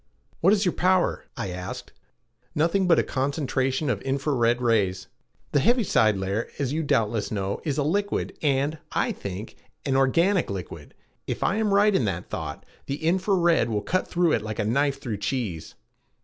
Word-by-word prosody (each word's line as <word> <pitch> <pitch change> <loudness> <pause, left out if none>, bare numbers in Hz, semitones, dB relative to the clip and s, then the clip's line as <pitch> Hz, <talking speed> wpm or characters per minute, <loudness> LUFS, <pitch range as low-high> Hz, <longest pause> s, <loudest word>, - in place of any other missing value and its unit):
"What 185 - +4
is 205 -1 +3
your 180 - +2
power?" 185 0 +1
I 95 - -3
asked. 90 0 -7 0.6
"Nothing 170 +5 +2
but 170 - +5
a - - +3
concentration 135 0 -1
of 105 -7 0
infra 140 +2 -1
red 120 -1 +2
rays. 100 -6 +1 0.5
The 145 - +3
heaviside 185 - +3
layer, 95 +4 -2
as 140 -1 -1
you 160 - 0
doubtless 115 -7 0
know, 100 -2 -2
is 145 -4 -2
a 145 - +2
liquid 200 +7 -1
and, 145 +1 +1
I - - +1
think, 100 +3 -7 0.3
an 135 -2 +1
organic 165 +8 +3
liquid. 95 -4 -7 0.3
If - - -2
I 200 - +1
am 220 -2 +1
right 205 +1 +4
in 130 - +2
that 90 -4 -3
thought, - - -5 0.2
the 140 - -1
infra 185 +6 +1
red 170 -8 +3
will 105 -2 -1
cut 185 - 0
through 175 -2 +2
it 115 - +2
like 110 0 -5
a - - 0
knife 140 +4 +1
through 115 -6 -4
cheese." 100 - -3
135 Hz, 180 wpm, -25 LUFS, 110-170 Hz, 0.6 s, but